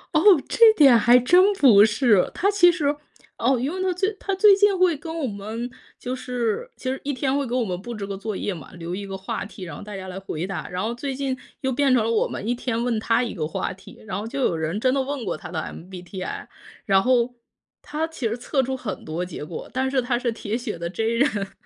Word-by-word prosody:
哦， - - +6 0.3
这 455 -2 +6
点 275 - +7
还 240 +2 +6
真 360 +11 +5
不 235 - +7
是。 220 -3 +3
他 400 +3 +1
其 395 -3 +6
实 295 -4 0 0.4
哦， 255 +3 +2
因 265 +5 -1
为 375 - -4
他 375 -1 +1
最 385 +4 0
他 390 - -2
最 405 +1 +7
近 400 -1 +3
会 365 -3 +3
跟 325 +3 -6
我 300 - -1
们 220 +2 -5 0.3
就 250 - -5
是 250 - -2
其 255 - -5
实 265 - -4
一 285 - -2
天 265 +1 -1
会 280 -1 -1
给 240 - -2
我 255 - +2
们 180 -4 -4
布 240 +3 -6
置 205 -2 -5
个 195 0 -5
作 210 +1 -4
业 200 - -2
嘛， 160 -5 -10
留 170 0 -6
一 200 +2 -5
个 195 0 -5
话 190 - -4
题， 200 -2 -10
然 175 - -7
后 - - -9
大 205 0 -8
家 190 -1 -7
来 185 - -6
回 180 -3 -4
答。 195 -1 -5
然 180 +1 -4
后 225 +2 -1
最 265 +2 -4
近 270 -1 -2 0.2
又 265 - 0
变 270 +1 +2
成 240 -3 +3
了 225 - 0
我 230 - +2
们 - - -6
一 240 - +1
天 240 -1 -2
问 240 -3 0
他 230 +3 +2
一 235 - -4
个 155 -6 -3
话 155 - -3
题， 190 0 -14
然 195 -2 -4
后 215 - -5
就 270 +4 -4
有 170 -9 +1
人 160 +4 -2
真 255 -1 +3
的 275 - +1
问 270 -2 -4
过 180 -6 -3
他 - - -9
的 160 -1 -3
MBTI， 180 +1 -7 0.4
然 195 -1 +4
后 250 +1 +2 0.5
他 305 +2 -3
其 320 -7 -3
实 225 +2 -3
测 270 +3 0
出 265 +1 -2
很 240 -6 -6
多 165 +3 -3
结 165 -4 -6
果， 165 - -7
但 260 +1 0
是 265 -1 +1
他 240 -1 -1
是 250 -1 -1
铁 220 0 -3
血 235 -7 -5
的 170 0 -4
J 220 +5 -2
人。 230 -4 0
240 Hz, 285 characters per minute, -23 LUFS, 195-275 Hz, 0.5 s, 点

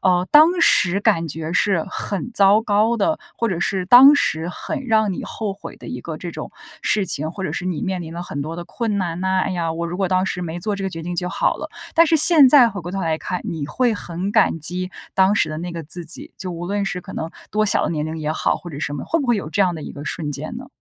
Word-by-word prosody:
呃， 180 -1 +2
当 330 +4 +6
时 190 - +4
感 200 -6 +2
觉 160 +2 -5
是 185 -2 +1
很 205 +4 -4
糟 200 0 +5
糕 220 +2 +2
的， 315 +8 0 0.2
或 230 - 0
者 175 -3 -2
是 185 0 -1
当 260 +6 +9
时 165 - 0
很 275 - -5
让 220 -3 +2
你 - - -5
后 215 -3 -4
悔 195 - -10
的 - - -12
一 - - -6
个 - - -6
这 - - -6
种 - - -7 0.3
事 200 -3 +1
情， 155 +1 -3
或 190 +2 -6
者 - - -3
是 - - -4
你 185 -3 -2
面 185 -2 -2
临 165 -1 -8
了 175 +1 -5
很 145 -5 -5
多 160 +3 -6
的 175 - -6
困 215 0 -2
难 175 -1 -3
呐， 190 0 +1
“哎 - - -2
呀， 170 -3 -2
我 170 +1 -3
如 175 +1 -5
果 190 -2 0
当 185 0 +1
时 180 - -3
没 170 0 -5
做 210 +1 -2
这 195 - -5
个 190 - -2
决 165 -2 -7
定 175 +2 -4
就 180 +1 -2
好 - - 0
了”。 - - -6 0.3
但 330 0 +6
是 320 - +3
现 310 -3 +7
在 250 -4 +7
回 200 -4 -6
过 175 - -7
头 195 +1 -3
来 165 -3 0
看， 180 - -4
你 155 -4 -4
会 235 - +1
很 180 +2 -4
感 - - +3
激 180 +4 -3 0.2
当 190 +2 +4
时 160 - +2
的 155 0 -5
那 175 +1 -5
个 165 -1 -6
自 170 +3 -5
己， 165 - -7
就 185 -2 -6
无 175 0 -6
论 200 +1 -1
是 180 -2 -3
可 - - -11
能 160 +1 -4 0.2
多 215 0 +1
小 205 - +2
的 - - -1
年 150 -2 -2
龄 160 +1 -5
也 155 0 -2
好， - - 0
或 175 - -10
者 140 - -7
什 145 - -3
么， 140 - -5
会 330 - 0
不 275 - -3
会 240 -2 +3
有 170 -6 -4
这 200 +5 +1
样 180 -2 +1
的 155 - -7
一 - - -7
个 145 - -9
瞬 150 -1 -3
间 155 - -6
呢？ 255 - -8
185 Hz, 305 characters per minute, -21 LUFS, 165-210 Hz, 0.3 s, 当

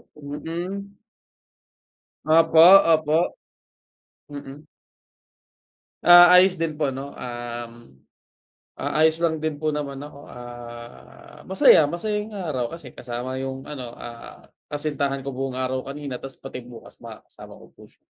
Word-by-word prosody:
Mm. 170 +7 -7 1.3
Opo, 160 0 +4 0.3
opo. 155 +2 +1 0.9
Mm. 145 +1 -10 1.4
Ah, 175 0 +9
ayos 185 +1 +5
din 155 -2 -2
po, 145 -3 -1
'no, 135 +2 -7
um, 120 -1 -6 1.0
ah, - - -4
ayos 160 0 +4
lang 160 -2 +1
din 155 -1 -2
po 155 +1 -2
naman 145 -2 -4
ako, 145 -1 -11
ah, 120 -1 -12
masaya 185 -5 +5
masaya 210 +7 -3
yung 215 - -11
araw 155 -11 -3
kasi 150 -7 -12
kasama 125 +2 -6
yung 135 0 -5
ano, 125 -5 -8
ah, 115 0 -11 0.2
kasintahan 145 -2 -3
ko 140 - -5
buong 130 0 -4
araw 130 0 -2
kanina 140 -2 -6
tapos 135 0 -9
pati 135 -1 -7
bukas 120 -1 -14
makakasama - - -13
ko - - -16
po - - -21
siya. - - -29
145 Hz, 130 wpm, -23 LUFS, 130-160 Hz, 1.4 s, Ah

